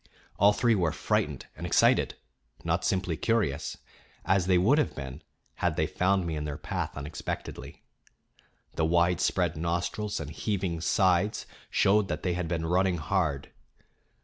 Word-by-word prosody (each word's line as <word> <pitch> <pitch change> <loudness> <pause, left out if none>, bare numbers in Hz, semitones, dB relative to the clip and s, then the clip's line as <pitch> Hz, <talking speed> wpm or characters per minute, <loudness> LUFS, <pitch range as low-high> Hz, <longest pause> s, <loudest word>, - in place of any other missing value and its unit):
All 100 +1 +7
three 115 +2 +2
were 90 -6 +1
frightened - - -1
and - - -9
excited, - - +3 0.5
not - - 0
simply 90 -3 0
curious, 100 -7 0 0.5
as 95 -2 +2
they 95 -1 +4
would 115 - +4
have 150 - 0
been 65 +1 -7 0.4
had - - 0
they - - +1
found 95 0 +1
me 80 -2 -2
in 75 - -3
their 75 -1 -4
path - - -4
unexpectedly. 75 +2 -6 0.9
The 80 - 0
widespread 85 +1 +2
nostrils 85 +6 -2
and 75 -2 -6
heaving 90 -2 -2
sides 95 +3 +2 0.2
showed 100 +1 +3
that - - -4
they 90 - 0
had 90 -1 -2
been 80 -1 -2
running 90 +1 +2
hard. 75 -4 -1
90 Hz, 150 wpm, -28 LUFS, 80-95 Hz, 0.9 s, All